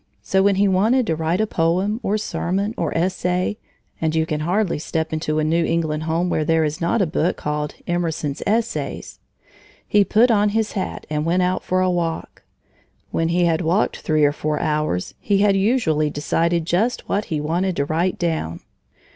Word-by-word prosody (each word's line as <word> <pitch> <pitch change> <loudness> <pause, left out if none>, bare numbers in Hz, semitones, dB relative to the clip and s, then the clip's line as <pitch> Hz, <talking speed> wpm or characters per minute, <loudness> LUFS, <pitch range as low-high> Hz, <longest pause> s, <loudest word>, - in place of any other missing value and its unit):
So 190 - +2
when 200 0 +3
he 200 +1 +3
wanted 220 +7 +3
to 165 - 0
write 165 +3 -1
a - - +2
poem, 185 +4 0
or 205 +2 0
sermon, 200 0 -2
or 165 - -2
essay, 180 +3 0 0.4
(and 160 0 0
you 160 0 +2
can 155 -1 -2
hardly 180 +2 0
step 160 +1 -3
into 155 -1 -1
a 155 - +1
New 165 +2 +2
England 160 -2 0
home 165 +2 0
where 155 -3 0
there 160 +1 +2
is 150 +1 -2
not 170 +5 +2
a - - +2
book 165 +1 0
called 150 0 -3
Emerson's 165 -5 -2
Essays) 225 +2 -2 0.7
he 205 -1 +4
put 230 +5 +4
on 210 -1 +3
his 220 -1 0
hat 190 - -4
and 150 0 0
went 175 +3 +2
out 180 +1 0
for 185 0 0
a 185 0 +2
walk. 170 -2 -3 0.7
When 165 - 0
he 175 +1 +2
had 165 -1 +1
walked 175 +5 +1
three 155 -2 +2
or 145 - +3
four 150 0 -2
hours, 150 - -1
he 200 -2 +1
had 200 0 +3
usually 195 - +2
decided 165 +3 0
just 215 +9 0
what 205 +2 0
he 155 - -2
wanted 175 +5 -1
to 140 - 0
write 170 +5 0
down. 160 - -2
170 Hz, 190 wpm, -21 LUFS, 155-195 Hz, 0.7 s, he